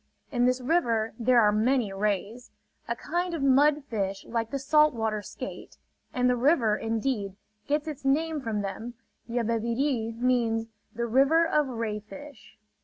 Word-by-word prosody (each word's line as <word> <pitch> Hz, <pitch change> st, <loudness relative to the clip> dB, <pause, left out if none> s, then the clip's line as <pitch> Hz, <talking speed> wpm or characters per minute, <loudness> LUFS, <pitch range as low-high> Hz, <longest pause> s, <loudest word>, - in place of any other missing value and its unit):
In 245 Hz, -2 st, +2 dB
this 255 Hz, +1 st, +2 dB
river 235 Hz, -7 st, +1 dB
there 245 Hz, +1 st, +4 dB
are 210 Hz, -2 st, +5 dB
many 220 Hz, 0 st, +1 dB
rays, 210 Hz, +4 st, -2 dB, 0.4 s
a -, -, -1 dB
kind 350 Hz, 0 st, -2 dB
of 295 Hz, -, -3 dB
mud 285 Hz, +2 st, +4 dB
fish 195 Hz, -5 st, -3 dB
like 230 Hz, -1 st, -2 dB
the 275 Hz, -, -2 dB
salt 300 Hz, +1 st, +3 dB
water 220 Hz, -2 st, -1 dB
skate; -, -, -9 dB, 0.3 s
and 250 Hz, 0 st, +1 dB
the 250 Hz, -, +3 dB
river, 245 Hz, -4 st, +3 dB
indeed, 225 Hz, -3 st, -2 dB, 0.3 s
gets 295 Hz, +2 st, 0 dB
its 300 Hz, -4 st, -6 dB
name 305 Hz, +3 st, +1 dB
from 220 Hz, -4 st, -2 dB
them: 220 Hz, +5 st, -6 dB, 0.3 s
"Yabebirì" 230 Hz, +1 st, -1 dB
means 235 Hz, -2 st, +1 dB, 0.3 s
the 235 Hz, +1 st, -3 dB
"river 275 Hz, +8 st, +4 dB
of 300 Hz, -3 st, +1 dB
ray 225 Hz, -4 st, -3 dB
fish." 270 Hz, +1 st, -13 dB
240 Hz, 155 wpm, -27 LUFS, 220-275 Hz, 0.4 s, are